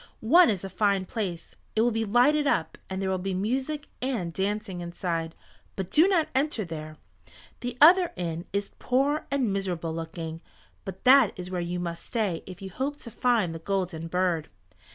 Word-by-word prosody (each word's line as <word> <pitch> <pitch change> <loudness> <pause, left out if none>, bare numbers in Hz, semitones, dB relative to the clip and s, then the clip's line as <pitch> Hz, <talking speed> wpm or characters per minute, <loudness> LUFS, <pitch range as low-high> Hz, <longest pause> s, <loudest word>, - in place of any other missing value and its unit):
One 355 0 +8
is 195 -4 -1
a 195 - -4
fine 200 -3 +1
place. 180 -5 -4 0.2
It 220 - +3
will 240 +1 +3
be 225 0 -1
lighted 270 +7 +4
up, 165 -10 +1
and 190 0 -3
there 190 -1 -1
will 185 - 0
be 190 0 -2
music 265 +9 -2
and 230 -10 -2
dancing 195 -1 -2
inside. 170 -2 -3 0.4
But 190 -2 -4
do 320 +5 +6
not 355 -5 +2
enter 265 -5 0
there. 155 -2 -7 0.6
The 245 0 -5
other 350 +3 +7
inn 170 -1 -4
is 200 0 -2
poor 275 +4 +1
and 260 -7 +1
miserable 175 -4 -2
looking, 165 0 -6 0.4
but 190 -1 -7
that 260 -4 +6
is 180 0 -6
where 180 -1 -1
you 175 +1 -3
must 170 -1 -4
stay 210 -9 -1
if 185 0 -9
you 190 - -6
hope 275 +8 -3
to 235 - -8
find 225 -8 +1
the 165 - -6
Golden 180 -2 -2
Bird." 175 -2 0
195 Hz, 185 wpm, -27 LUFS, 175-250 Hz, 0.6 s, One